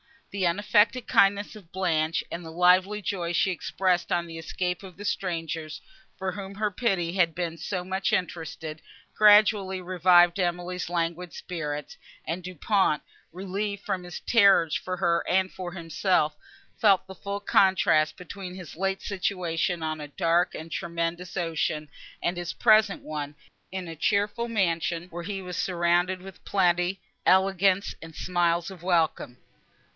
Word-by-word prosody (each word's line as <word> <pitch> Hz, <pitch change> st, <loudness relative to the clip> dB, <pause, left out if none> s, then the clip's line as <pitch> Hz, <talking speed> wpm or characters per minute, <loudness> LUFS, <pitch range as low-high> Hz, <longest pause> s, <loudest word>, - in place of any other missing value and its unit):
The 195 Hz, -2 st, 0 dB
unaffected 210 Hz, +6 st, +2 dB
kindness 200 Hz, +1 st, +3 dB
of 180 Hz, -6 st, -17 dB
Blanche 165 Hz, -4 st, 0 dB
and 170 Hz, -, -5 dB
the 165 Hz, -, -8 dB
lively 185 Hz, +4 st, +4 dB
joy 175 Hz, -3 st, -2 dB
she 190 Hz, -, +2 dB
expressed 180 Hz, 0 st, 0 dB
on 175 Hz, 0 st, +1 dB
the 165 Hz, -1 st, -8 dB
escape 180 Hz, +2 st, -3 dB
of 190 Hz, -3 st, -11 dB
the 205 Hz, -, -8 dB
strangers, 165 Hz, -7 st, -3 dB, 0.4 s
for 190 Hz, -1 st, -2 dB
whom 195 Hz, +1 st, -7 dB
her 210 Hz, 0 st, -1 dB
pity 190 Hz, -6 st, 0 dB
had 175 Hz, -4 st, +2 dB
been 170 Hz, -2 st, -3 dB
so 180 Hz, +3 st, -3 dB
much 190 Hz, +1 st, -1 dB
interested, 160 Hz, -3 st, -3 dB, 0.3 s
gradually 205 Hz, -2 st, +5 dB
revived 175 Hz, 0 st, +4 dB
Emily's 175 Hz, 0 st, -2 dB
languid 170 Hz, 0 st, -2 dB
spirits; 150 Hz, -5 st, -5 dB, 0.3 s
and 170 Hz, +3 st, -3 dB
Du 185 Hz, +1 st, -7 dB
Pont, 190 Hz, -3 st, +1 dB, 0.3 s
relieved 195 Hz, +2 st, -4 dB
from 185 Hz, -1 st, -2 dB
his 175 Hz, 0 st, -8 dB
terrors 195 Hz, -8 st, +5 dB
for 185 Hz, 0 st, -2 dB
her 170 Hz, -2 st, +1 dB
and 190 Hz, +1 st, +2 dB
for 180 Hz, -2 st, -6 dB
himself, 165 Hz, -2 st, 0 dB, 0.4 s
felt 195 Hz, -4 st, +4 dB
the 190 Hz, -, -10 dB
full 200 Hz, +2 st, -5 dB
contrast, 190 Hz, -6 st, +3 dB
between 180 Hz, 0 st, -8 dB
his 180 Hz, -4 st, -10 dB
late 195 Hz, +1 st, -1 dB
situation 180 Hz, -3 st, -1 dB
on 155 Hz, 0 st, -2 dB
a 150 Hz, -, -6 dB
dark 165 Hz, +4 st, +1 dB
and 160 Hz, +1 st, -8 dB
tremendous 170 Hz, +2 st, -3 dB
ocean, 160 Hz, -3 st, -1 dB, 0.3 s
and 175 Hz, +1 st, 0 dB
his 175 Hz, -1 st, -4 dB
present 215 Hz, -3 st, +4 dB
one, 150 Hz, -1 st, -5 dB, 0.3 s
in 185 Hz, -2 st, -5 dB
a 165 Hz, -1 st, -8 dB
cheerful 205 Hz, +6 st, 0 dB
mansion, 175 Hz, -5 st, -1 dB
where 175 Hz, 0 st, -6 dB
he 195 Hz, +1 st, -4 dB
was 180 Hz, -1 st, -6 dB
surrounded 175 Hz, +1 st, +1 dB
with 190 Hz, 0 st, -12 dB
plenty, 180 Hz, 0 st, +1 dB, 0.3 s
elegance 190 Hz, +1 st, +3 dB
and 160 Hz, -1 st, -11 dB
smiles 175 Hz, 0 st, 0 dB
of 185 Hz, -4 st, -11 dB
welcome. 165 Hz, -8 st, 0 dB
180 Hz, 150 wpm, -27 LUFS, 170-195 Hz, 0.4 s, gradually